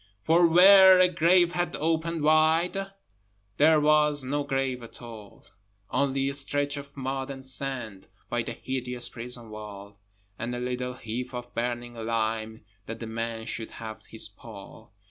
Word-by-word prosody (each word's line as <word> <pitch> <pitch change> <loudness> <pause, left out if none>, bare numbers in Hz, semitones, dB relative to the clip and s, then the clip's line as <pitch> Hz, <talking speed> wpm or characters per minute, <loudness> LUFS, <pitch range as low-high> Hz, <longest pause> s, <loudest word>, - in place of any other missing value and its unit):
For 170 +2 +5
where 190 +2 +8
a 185 - +6
grave 175 0 +3
had 175 0 -2
opened 165 0 -1
wide, 160 +5 +3 0.7
There 155 +1 +5
was 150 -1 +3
no 145 +3 -1
grave 135 -3 -2
at 115 - -11
all: 110 -4 -12 0.5
Only 135 0 0
a 140 - -2
stretch 145 +1 0
of 140 0 -9
mud 135 0 -3
and 135 -1 -7
sand 130 -7 -3 0.2
By - - -1
the - - -5
hideous 125 -1 -4
prison 120 -1 -7
wall, 105 -1 -10 0.4
And 120 +2 -3
a - - -4
little 125 0 -3
heap 125 +2 -6
of 120 0 -7
burning 120 0 -3
lime, 110 -1 -3 0.2
That 115 0 -6
the 115 - -6
man 115 0 -4
should 110 - -5
have 110 -1 -8
his 110 - -3
pall. 110 +1 -13
130 Hz, 155 wpm, -27 LUFS, 115-150 Hz, 0.7 s, where